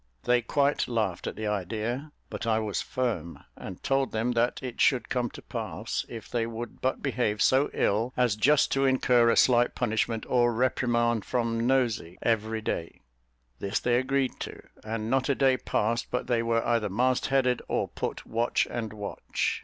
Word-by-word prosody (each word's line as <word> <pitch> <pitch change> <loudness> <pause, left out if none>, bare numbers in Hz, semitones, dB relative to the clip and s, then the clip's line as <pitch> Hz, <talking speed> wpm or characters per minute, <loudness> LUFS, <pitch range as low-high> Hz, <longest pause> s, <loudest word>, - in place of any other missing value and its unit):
They 125 0 +3
quite 140 +4 +1
laughed 110 -7 -1
at - - -4
the 110 - -4
idea; 110 - -2 0.2
but - - -4
I 110 -1 +3
was 110 -2 -1
firm, 110 -11 -3
and 95 - -9
told 135 0 +1
them 115 +3 0
that 120 +1 +1
it 125 -2 -4
should 130 -3 +3
come 125 -2 0
to - - -12
pass, - - -4
if 115 -2 -8
they 115 -1 -1
would 115 0 -7
but 130 - -1
behave 120 -6 0
so 135 +5 +4
ill 110 +5 +1
as 125 -4 +3
just 140 +7 +3
to 135 0 +2
incur 125 -3 +4
a - - +3
slight 120 -1 +4
punishment 115 -1 -1
or 120 -1 +3
reprimand 120 -2 +1
from 115 -1 -1
"Nosey" 120 -9 0
every 110 -1 0
day; 85 -5 -4 0.6
this 100 +2 -1
they 120 0 +2
agreed 135 0 0
to; - - -7 0.2
and 110 0 -3
not 135 +1 +1
a 140 - +3
day 135 -1 +4
passed 115 -1 -1
but 125 - -2
they 120 -2 +1
were 115 0 0
either 115 -3 +1
mast 125 +6 +1
headed, 130 -2 +2
or - - 0
put - - -4
watch 115 +1 0
and 110 -3 -4
watch. 105 -1 -3
120 Hz, 180 wpm, -28 LUFS, 110-125 Hz, 0.6 s, so